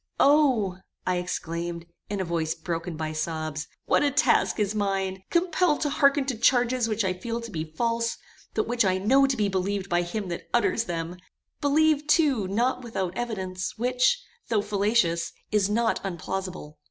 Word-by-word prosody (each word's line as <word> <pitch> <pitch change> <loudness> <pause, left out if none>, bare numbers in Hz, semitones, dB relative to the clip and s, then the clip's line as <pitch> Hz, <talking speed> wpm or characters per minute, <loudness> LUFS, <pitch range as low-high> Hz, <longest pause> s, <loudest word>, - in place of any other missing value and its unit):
"O!" 260 -11 +4 0.3
I 180 -1 +1
exclaimed, 170 -1 -4 0.2
in 205 -1 -2
a 190 - -1
voice 165 -2 -1
broken 165 0 -4
by 155 0 -3
sobs, 155 -1 -3 0.2
"what - - +3
a 290 - +3
task 280 - +2
is 210 -1 +1
mine! 195 -2 -1
Compelled 345 -2 +2
to 295 - 0
hearken 280 -1 +3
to 260 -4 -2
charges 245 0 +3
which 215 -1 0
I 185 - +1
feel 230 +6 -4
to 230 -1 -8
be 155 -2 -4
false, 230 0 0 0.4
but 220 - 0
which 240 0 +2
I 185 -1 +2
know 265 +8 +4
to 270 - -1
be 210 -1 +2
believed 195 0 -1
by 175 0 +2
him 190 +3 -4
that 170 - -6
utters 235 -1 +2
them; 170 -1 -4 0.4
believed 300 +1 +3
too 280 - +3
not 240 +7 0
without 190 -7 -3
evidence, 190 -6 -4
which, 250 - +2 0.3
though 215 -3 +1
fallacious, 200 -5 +1 0.2
is 205 -2 +2
not 225 +2 +1
unplausible. 185 -3 -5
205 Hz, 170 wpm, -26 LUFS, 180-245 Hz, 0.4 s, O